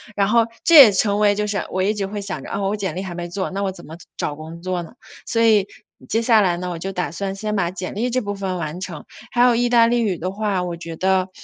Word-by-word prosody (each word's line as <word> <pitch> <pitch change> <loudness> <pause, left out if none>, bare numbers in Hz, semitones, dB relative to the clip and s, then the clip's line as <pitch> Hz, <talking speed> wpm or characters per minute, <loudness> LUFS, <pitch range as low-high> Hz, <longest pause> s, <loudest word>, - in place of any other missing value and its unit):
然 200 -1 +2
后 230 +2 +4 0.2
这 335 - +4
也 270 -8 +11
成 200 +1 +1
为 205 -1 +4
就 210 +1 -2
是 205 -1 -2
我 185 - -1
一 200 +3 +2
直 200 -1 -2
会 205 +1 -5
想 195 -2 -6
着， - - -9
哦， 195 -1 -1
我 205 - -1
简 190 -5 -3
历 185 - -3
还 180 -3 -6
没 175 0 -5
做， 190 +2 -3
那 195 +1 -3
我 195 - -1
怎 180 -2 -13
么 160 - -10 0.2
找 145 - -3
工 160 +2 -10
作 180 -1 -2
呢？ 165 - -13 0.3
所 230 - 0
以， 215 -4 +4 0.4
接 225 - 0
下 230 -1 +4
来 185 -4 +2
呢， 180 +1 -4
我 175 - -4
就 190 +4 -5
打 180 -3 -3
算 195 +3 -4
先 210 +1 -3
把 175 -4 0
简 185 0 -6
历 235 +4 -1
这 255 +1 0
部 205 -2 -4
分 190 -2 -3
完 165 0 -5
成， 180 -4 -7 0.3
还 240 - +1
有 245 -1 +5
意 240 +1 +1
大 235 -1 +5
利 240 +1 +1
语 200 -6 0
的 185 +2 -3
话， 200 -2 -1
我 175 -1 -4
觉 165 -1 -7
得 190 +2 +1
195 Hz, 310 characters per minute, -21 LUFS, 180-210 Hz, 0.4 s, 也